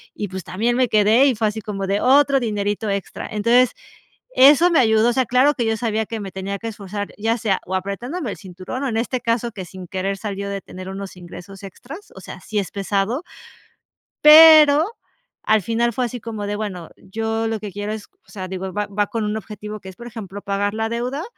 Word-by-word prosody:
Y 205 Hz, -, -4 dB
pues 185 Hz, -1 st, -7 dB
también 225 Hz, +8 st, -1 dB
me 255 Hz, -1 st, +3 dB
quedé 220 Hz, +4 st, +4 dB
y 270 Hz, -3 st, +3 dB
fue 220 Hz, 0 st, +1 dB
así 215 Hz, +1 st, -5 dB
como 195 Hz, -2 st, -4 dB
de 200 Hz, +1 st, 0 dB
otro 275 Hz, +1 st, +4 dB
dinerito 210 Hz, -2 st, -2 dB
extra. 200 Hz, -1 st, -4 dB
Entonces 235 Hz, +4 st, +3 dB, 0.7 s
eso 290 Hz, +6 st, +7 dB
me 340 Hz, -, +3 dB
ayudó, 220 Hz, -1 st, +4 dB
o -, -, +1 dB
sea, 260 Hz, 0 st, +1 dB
claro 255 Hz, +5 st, +3 dB
que 240 Hz, -, -1 dB
yo 225 Hz, 0 st, 0 dB
sabía 220 Hz, -1 st, -1 dB
que 225 Hz, +1 st, -5 dB
me 195 Hz, -2 st, -6 dB
tenía 195 Hz, +1 st, -5 dB
que 230 Hz, -, -6 dB
esforzar, 205 Hz, -1 st, -5 dB
ya 225 Hz, +3 st, 0 dB
sea 210 Hz, -4 st, 0 dB
o 185 Hz, -, -6 dB
apretándome 235 Hz, -, -4 dB
el -, -, -7 dB
cinturón, 190 Hz, +7 st, -7 dB
o -, -, 0 dB
en 225 Hz, -, -2 dB
este 245 Hz, +2 st, -2 dB
caso 235 Hz, 0 st, -1 dB
que 195 Hz, -3 st, -7 dB
sin 185 Hz, +1 st, -10 dB
querer 190 Hz, +2 st, -3 dB
salió 200 Hz, -1 st, -5 dB
de 200 Hz, 0 st, -4 dB
tener 185 Hz, 0 st, -9 dB
unos 195 Hz, 0 st, -7 dB
ingresos 180 Hz, +2 st, -11 dB
extras, 270 Hz, -, -11 dB
o -, -, -10 dB
sea, -, -, -9 dB
sí 210 Hz, -, -2 dB
es 195 Hz, -, -3 dB
pesado. 200 Hz, -, -1 dB, 1.0 s
Pero 305 Hz, 0 st, +9 dB, 0.6 s
al 220 Hz, -1 st, +3 dB
final 235 Hz, +4 st, 0 dB
fue 250 Hz, +3 st, -1 dB
así 245 Hz, 0 st, -5 dB
como 220 Hz, -2 st, -5 dB
de, 205 Hz, 0 st, -2 dB
bueno, 190 Hz, -6 st, -5 dB
yo 225 Hz, +3 st, -3 dB
lo 225 Hz, -1 st, -2 dB
que 205 Hz, -2 st, -7 dB
quiero 205 Hz, +2 st, -4 dB
es, 215 Hz, -1 st, -7 dB, 0.2 s
o -, -, -20 dB
sea, 185 Hz, -2 st, -6 dB
digo, 190 Hz, 0 st, -5 dB
va 210 Hz, +1 st, -2 dB
va 205 Hz, 0 st, -1 dB
con 225 Hz, +1 st, -3 dB
un 210 Hz, +1 st, -2 dB
objetivo 210 Hz, -1 st, -7 dB
que 190 Hz, -, -11 dB
es, 190 Hz, -, -11 dB
por 240 Hz, -, -10 dB
ejemplo, 205 Hz, -4 st, -8 dB
pagar 200 Hz, +1 st, -1 dB
la 220 Hz, 0 st, -1 dB
deuda 250 Hz, +7 st, -3 dB
215 Hz, 225 wpm, -21 LUFS, 195-235 Hz, 1.0 s, Pero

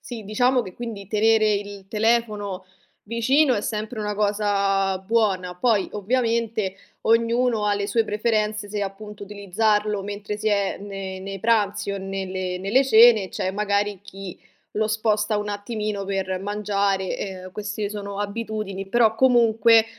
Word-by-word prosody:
Sì, 235 Hz, -3 st, -7 dB
diciamo 245 Hz, +4 st, +2 dB
che 185 Hz, -3 st, -10 dB
quindi 225 Hz, -5 st, -6 dB
tenere 215 Hz, +1 st, +3 dB
il 200 Hz, -1 st, -4 dB
telefono 210 Hz, -3 st, 0 dB, 0.4 s
vicino 255 Hz, +5 st, +2 dB
è 205 Hz, -, 0 dB
sempre 215 Hz, +2 st, -4 dB
una 210 Hz, 0 st, -2 dB
cosa 200 Hz, -2 st, +1 dB
buona. 190 Hz, -3 st, 0 dB
Poi 210 Hz, 0 st, +1 dB
ovviamente 225 Hz, -2 st, 0 dB, 0.3 s
ognuno 230 Hz, 0 st, +2 dB
ha 205 Hz, -, +2 dB
le 200 Hz, 0 st, -2 dB
sue 225 Hz, 0 st, +1 dB
preferenze 215 Hz, -1 st, -1 dB
se 205 Hz, 0 st, -3 dB
appunto 205 Hz, +1 st, -7 dB
utilizzarlo 210 Hz, +1 st, 0 dB
mentre 205 Hz, +1 st, -5 dB
si 215 Hz, -, 0 dB
è 200 Hz, -2 st, 0 dB
ne 195 Hz, -2 st, -6 dB
nei 195 Hz, +1 st, -6 dB
pranzi 210 Hz, -2 st, +1 dB
o 200 Hz, -, -3 dB
nelle 190 Hz, -1 st, -4 dB
nelle 210 Hz, +9 st, +2 dB
cene, 225 Hz, -5 st, +6 dB
c'è 185 Hz, -, -2 dB
magari 205 Hz, 0 st, -1 dB
chi 195 Hz, -2 st, -9 dB, 0.3 s
lo 215 Hz, +1 st, 0 dB
sposta 215 Hz, 0 st, +1 dB
un 205 Hz, 0 st, -3 dB
attimino 205 Hz, -1 st, -3 dB
per 190 Hz, -1 st, -2 dB
mangiare. 200 Hz, -1 st, -1 dB
Ehm, 185 Hz, -2 st, -6 dB
queste 210 Hz, 0 st, -3 dB
sono 200 Hz, -1 st, -6 dB
abitudini. 205 Hz, -2 st, -4 dB
Però 225 Hz, 0 st, +3 dB
comunque 230 Hz, -2 st, +5 dB
210 Hz, 145 wpm, -23 LUFS, 195-220 Hz, 0.4 s, cene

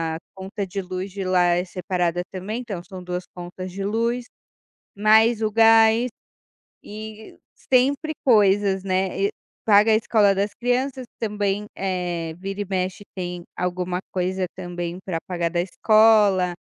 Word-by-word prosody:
a -, -, -4 dB, 0.2 s
conta 195 Hz, +2 st, -5 dB
de 195 Hz, +1 st, -4 dB
luz 185 Hz, +1 st, -5 dB
de 195 Hz, 0 st, -5 dB
lá 185 Hz, -1 st, +3 dB
é 180 Hz, -, -1 dB
separada 180 Hz, -1 st, -1 dB
também 205 Hz, +6 st, -4 dB
então 205 Hz, -8 st, -6 dB
são 180 Hz, +1 st, -10 dB
2 180 Hz, 0 st, -4 dB
contas 180 Hz, +1 st, -7 dB
de 195 Hz, -, -4 dB
luz, 230 Hz, +4 st, 0 dB, 0.7 s
mais 220 Hz, +2 st, +4 dB
o 215 Hz, -, +1 dB
gás 225 Hz, +2 st, +5 dB, 0.7 s
e 215 Hz, +1 st, -9 dB, 0.3 s
sempre 280 Hz, +5 st, +3 dB
coisas, 200 Hz, -5 st, +4 dB
né, 190 Hz, 0 st, -1 dB
e -, -, -3 dB, 0.3 s
paga 210 Hz, +1 st, +5 dB
a -, -, +6 dB
escola 215 Hz, -2 st, +3 dB
das 200 Hz, +2 st, -1 dB
crianças 255 Hz, +2 st, -1 dB
também, 210 Hz, -2 st, -1 dB
eh, 175 Hz, -4 st, -2 dB
vira 195 Hz, +2 st, -5 dB
e -, -, -3 dB
mexe 185 Hz, +1 st, -2 dB
tem 180 Hz, -1 st, -5 dB
alguma 180 Hz, 0 st, -2 dB
coisa 185 Hz, 0 st, -1 dB
também 175 Hz, -1 st, -5 dB
pra 180 Hz, -4 st, -2 dB
pagar 170 Hz, -2 st, -1 dB
da 175 Hz, -1 st, +1 dB
escola, 205 Hz, -2 st, +4 dB
195 Hz, 150 wpm, -23 LUFS, 180-220 Hz, 0.7 s, a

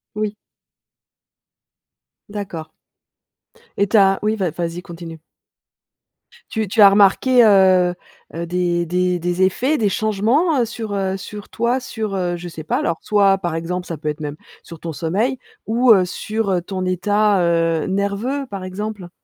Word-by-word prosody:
Oui. 210 Hz, 0 st, -2 dB, 1.9 s
D'accord. 190 Hz, -6 st, -6 dB, 1.1 s
Et 200 Hz, -, +2 dB
tu 220 Hz, -, +3 dB
as 195 Hz, -1 st, +4 dB
oui, 215 Hz, +1 st, +1 dB
vas 185 Hz, -6 st, -1 dB
vas-y 170 Hz, +2 st, -4 dB
continue. 170 Hz, -3 st, -9 dB, 1.3 s
Tu 220 Hz, -2 st, -1 dB
tu 210 Hz, +3 st, +2 dB
as 200 Hz, -, +10 dB
remarqué, 210 Hz, +5 st, +4 dB
heu, 185 Hz, -3 st, +5 dB, 0.4 s
heu, 170 Hz, +1 st, -4 dB
des 175 Hz, -1 st, 0 dB
des 180 Hz, +1 st, 0 dB
des 175 Hz, +2 st, -2 dB
effets, 255 Hz, +11 st, +1 dB
des 215 Hz, -5 st, +1 dB
changements, 225 Hz, -, +1 dB
heu, 240 Hz, -, +2 dB
sur, 220 Hz, -2 st, -6 dB
heu, 190 Hz, -1 st, -1 dB
sur 205 Hz, +2 st, -8 dB
toi 235 Hz, +3 st, 0 dB
sur, 220 Hz, -5 st, -4 dB
heu, 175 Hz, -2 st, -1 dB
je 175 Hz, -, -8 dB
sais 160 Hz, -2 st, -8 dB
pas. 155 Hz, -, -1 dB
Alors, 165 Hz, -, -1 dB
soit, 200 Hz, -2 st, +3 dB
par 175 Hz, -3 st, -3 dB
exemple 180 Hz, +2 st, -3 dB
ça 165 Hz, -, -5 dB
peut 150 Hz, +1 st, -3 dB
être 150 Hz, +1 st, -4 dB
même 150 Hz, -1 st, -5 dB, 0.3 s
sur 165 Hz, -2 st, -11 dB
ton 165 Hz, -, -5 dB
sommeil 195 Hz, -, -1 dB, 0.3 s
ou, 240 Hz, +2 st, +4 dB
heu, 185 Hz, -2 st, +3 dB
sur, 215 Hz, +3 st, -3 dB
heu, 180 Hz, -2 st, +1 dB
ton 185 Hz, 0 st, -4 dB
état, 205 Hz, +2 st, +2 dB
heu, 165 Hz, -2 st, +1 dB
nerveux, 200 Hz, +8 st, -2 dB
par 195 Hz, -4 st, -7 dB
exemple? 195 Hz, 0 st, -6 dB
195 Hz, 160 wpm, -20 LUFS, 175-215 Hz, 1.9 s, as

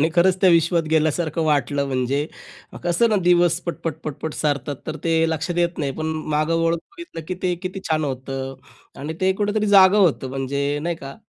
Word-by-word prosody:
आणि 160 Hz, -, +4 dB
खरचं 185 Hz, +1 st, +4 dB
त्या 190 Hz, -, +6 dB
विश्वात 170 Hz, 0 st, +3 dB
गेल्यासारखं 160 Hz, +1 st, +1 dB
वाटलं. 145 Hz, -1 st, +1 dB
म्हणजे 135 Hz, +2 st, -1 dB, 0.6 s
कसं 175 Hz, +7 st, +3 dB
ना, 215 Hz, -, +2 dB
दिवस 175 Hz, -1 st, +4 dB
पट-पट, 165 Hz, -1 st, -3 dB
पट-पट 155 Hz, +1 st, -5 dB
सरतात. 145 Hz, -2 st, -1 dB
तर 155 Hz, 0 st, -4 dB
ते 165 Hz, -, +2 dB
लक्षात 165 Hz, +2 st, -2 dB
येत 175 Hz, 0 st, 0 dB
नाही. 140 Hz, -3 st, -1 dB
पण 155 Hz, -, -2 dB, 0.3 s
मागं 155 Hz, +2 st, +1 dB
वळून 165 Hz, 0 st, +2 dB
बघितलं, 345 Hz, -, -9 dB
की 185 Hz, -, -2 dB
ते 180 Hz, -1 st, +1 dB
किती 185 Hz, +1 st, -4 dB
छान 155 Hz, -1 st, +1 dB
होतं 135 Hz, 0 st, -4 dB, 0.5 s
आणि 150 Hz, +3 st, -4 dB
ते 190 Hz, 0 st, +3 dB
कुठेतरी 210 Hz, +2 st, 0 dB
जागं 200 Hz, 0 st, +6 dB
होतं 160 Hz, -8 st, +2 dB
म्हणजे 140 Hz, +1 st, -2 dB
नाही 170 Hz, -1 st, -2 dB
का. 135 Hz, -3 st, -9 dB
160 Hz, 185 wpm, -22 LUFS, 145-175 Hz, 0.6 s, त्या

